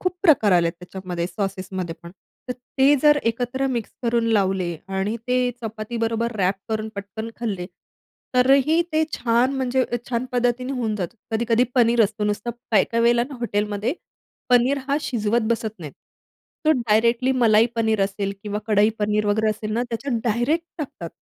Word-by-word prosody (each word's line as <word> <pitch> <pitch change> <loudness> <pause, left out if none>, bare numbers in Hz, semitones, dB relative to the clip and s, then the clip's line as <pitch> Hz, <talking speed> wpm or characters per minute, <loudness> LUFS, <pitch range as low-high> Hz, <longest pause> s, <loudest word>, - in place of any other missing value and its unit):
खूप 365 -1 -1
प्रकार 280 - +5
आलेत 170 -1 +3
त्याच्यामध्ये 180 -1 -5
सॉसेसमध्ये 190 -3 -4
पण. 170 - -10 0.4
तर - - 0 0.3
ते 275 +2 +6
जर 295 -1 +6
एकत्र 245 +3 -2
मिक्स 240 -5 -2
करून 235 -1 +1
लावले 190 -4 +1
आणि 195 +3 -1
ते 250 0 +2
चपातीबरोबर 225 +1 -2
व्रॅप 190 -2 +1
करून 220 0 -2
पटकन 205 +3 -6
खाल्ले, 200 -7 -3 0.7
तरीही 275 +5 +4
ते 315 - +3
छान, 240 +2 +2
म्हणजे 260 0 +1
अ, - - +2
छान 240 -1 -1
पद्धतीने 245 +1 0
होऊन 235 -5 -1
जातं. 190 +3 -4 0.2
कधी-कधी 230 +2 +2
पनीर 235 -1 +4
असतो. 210 +1 -3
नुसतं 210 +3 -1 0.2
काही-काही 230 +1 +3
वेळेला 235 0 +4
ना, 285 - -8
हॉटेलमध्ये 210 +2 -1 0.6
पनीर 250 +3 +4
हा 280 - +2
शिजवत 235 -4 0
बसत 220 -2 -2
नाही. 155 -5 -8 0.7
तो 310 - +5
डायरेक्टली 235 0 +2
मलाई 230 -3 +4
पनीर 220 -2 +1
असेल, 195 0 -3
किंवा 210 0 -3
कढई 210 0 +4
पनीर 210 0 +1
वगैरे 215 +1 +2
असेल 215 0 -4
ना, 235 +2 0
त्याच्यात 235 +1 -2
डायरेक्ट 245 +9 +1
टाकतात. 215 - -6
230 Hz, 160 wpm, -23 LUFS, 205-245 Hz, 0.7 s, ते